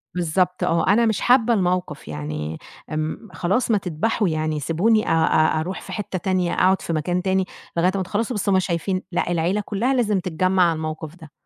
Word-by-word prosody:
بالضبط، 180 +1 0
آه، 165 0 +1
أنا 220 +5 +4
مش 220 -4 0
حابّة 245 -1 +4
الموقِف، 180 -6 -1
يعني 75 +1 -5 0.3
آمم 155 +8 -3
خلاص 195 +9 0
ما 215 - +4
تدبَحوا 195 +3 -1
يعني 155 -1 -1
سيبوني 200 +9 +2
أ - - 0
أ 160 -1 +3
أرُوح 180 +4 -4
في - - -10
حِتّه 190 0 -4
تانية، 185 -1 0
أقعُد 190 +1 +3
في 165 - -3
مكان 175 +3 -1
تاني 190 0 +1 0.3
لغاية 175 +2 +3
أمّا 195 - 0
تخلّصوا، 215 +6 -2
بس 205 - -1
هُم 190 -1 +4
شايفين 185 +1 -1
لأ، 175 0 -1
العيلة 175 +5 +1
كلّها 230 +6 0
لازم 215 -6 +1
تتجمّع 185 +1 +1
على 170 -1 +3
الموقِف 155 0 -5
ده. 160 -4 -14
180 Hz, 195 wpm, -22 LUFS, 160-200 Hz, 0.3 s, أنا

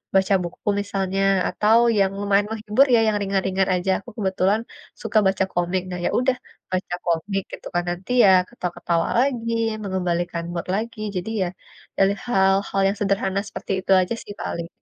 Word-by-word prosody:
baca 190 +1 +3
buku 175 +3 -9
misalnya, 195 -1 -2 0.3
atau 215 +2 +3 0.2
yang 195 -1 +3
lumayan 205 0 +2
menghibur 220 +4 +3
ya, 230 - +5
yang 215 -1 +2
ringan-ringan 195 -1 0
aja. 180 +1 0
Aku 195 - -13
kebetulan 195 +1 +1 0.4
suka - - -1
baca 190 0 +1
komik. 175 +1 0
Nah, 180 - -4
ya - - +2
udah, 255 0 +2 0.4
baca 185 -1 -2
komik 185 +4 0
gitu - - -8
kan, 175 - +2
nanti 180 +7 -5
ya 195 - +7 0.2
ketawa-ketawa 175 -6 -2
lagi, 240 -3 0 0.3
mengembalikan 175 -3 -2
mood 170 - -4
lagi. 225 +1 -4 0.2
Jadi 180 +3 -3
ya, 180 - -1 0.5
dari 195 +1 +4
hal-hal 195 -3 +2
yang 200 +1 -1
sederhana 195 -1 0
seperti - - -7
itu 190 - -3
aja 185 +5 -2
sih 205 - -9
paling. 170 0 -4
195 Hz, 165 wpm, -23 LUFS, 180-210 Hz, 0.5 s, ya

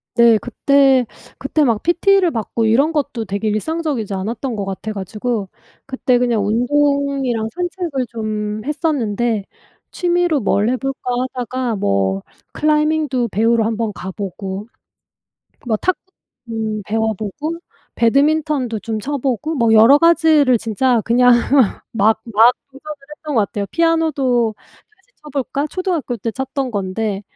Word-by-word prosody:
네 235 -2 +6
그때 270 0 +3 0.3
그때 295 +3 0
막 230 -6 +1
PT를 360 +1 +3
받고 225 -1 -2
이런 265 +8 +3
것도 285 -7 -2
되게 205 +2 -2
일상적이지 265 -1 -2
않았던 230 +6 -3
거 200 -2 -3
같아 195 +3 -5
가지고 210 +1 -3 0.4
그때 260 -2 +1
그냥 240 -4 +1
운동이랑 270 0 +1
산책을 350 -6 -3
좀 215 -2 -4
했었는데 240 - -1 0.5
취미로 350 -3 +1
뭘 210 -1 +1
해볼까 270 +2 -2 0.3
하다가 250 -1 -3
뭐 100 - 0 0.3
클라이밍도 300 -4 +1
배우러 225 +2 +2
한번 225 0 -1
가보고 190 +1 -6 1.0
뭐 225 -2 +1
탁구 370 +11 0 0.5
음 220 -2 -3
배워보고 220 - -2 0.4
배드민턴도 275 -1 +1
좀 220 0 -3
쳐보고 280 +3 -2
뭐 230 -5 +2
여러 225 +6 +7
가지를 315 -6 +4
진짜 230 +2 +1
그냥 245 +1 +5 0.6
막 220 0 +2
막 230 +2 +5 0.2
도전을 295 +3 -9 0.2
했던 300 -1 -6
것 - - +5
같아요. 200 +1 -4
피아노도 295 -9 +1 0.4
다시 430 +4 -35
쳐볼까? 285 0 -3
초등학교 340 -7 -2
때 225 +3 -3
쳤던 265 +1 -3
건데. 200 +1 -2
245 Hz, 280 characters per minute, -18 LUFS, 220-290 Hz, 1.0 s, 여러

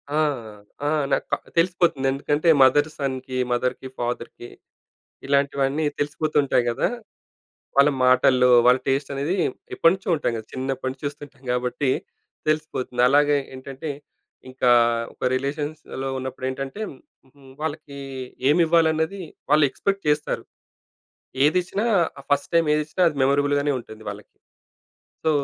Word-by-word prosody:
ఆ! - - +2 0.7
ఆ! - - +2 0.2
నాకు - - +1
క - - +4 0.2
తెలిసిపోతుంది. 170 -5 +2
ఎందుకంటే, 145 +4 0
మదర్, 145 +4 +4
సన్‍కి, 130 -2 -3
మదర్‌కి, 125 +2 -1
ఫాదర్‌కి 120 0 -4 0.8
ఇలాంటివన్నీ 140 +1 +1
తెలిసిపోతుంటాయి 145 -2 +1
గదా! 115 - 0 0.9
వాళ్ళ 140 +1 +7 0.2
మాటల్లో 125 0 +5 0.2
వాళ్ళ 125 +1 +6
టేస్టనేది 140 +4 -1 0.4
ఎప్పటి 165 - +5
నుంచో 190 0 -6
ఉంటాయి 145 -6 -1
గదా! 110 -1 -6
చిన్నప్పటి 130 0 -3
నుంచి 130 +2 -14
చూస్తుంటాం 145 -1 -8
గాబట్టి, 125 +3 -1 0.6
తెలిసిపోతుంది. 150 -5 -1
అలాగే 145 +1 +4 0.2
ఏంటంటే, 135 +3 -6 0.6
ఇంకా 130 -1 +2 0.4
ఒక - - -11
రిలేషన్స్‌లో 145 0 -4
ఉన్నప్పుడేంటంటే, 130 +6 -5
హ్మ్, 130 - -16 0.3
హ్మ్, 135 -2 -17
వాళ్ళకీ 150 -2 -5 0.5
ఏమివ్వాలన్నది 165 +3 +2 0.3
వాళ్ళెక్స్‌పెక్ట్ 155 +7 +2
చేస్తారు. 150 0 0 1.0
ఏదిచ్చినా 180 +7 +1 0.4
ఆహ్, 140 - -17
ఫస్ట్ 145 0 +1
టైమేదిచ్చినా 155 +1 +2
అది 150 - -6
మెమోరబుల్‌గానే 145 +1 +2
ఉంటుంది 110 -2 -11
వాళ్ళకి. 105 +1 -11 0.9
సో, 160 - +3
140 Hz, 110 wpm, -23 LUFS, 130-155 Hz, 1.0 s, వాళ్ళ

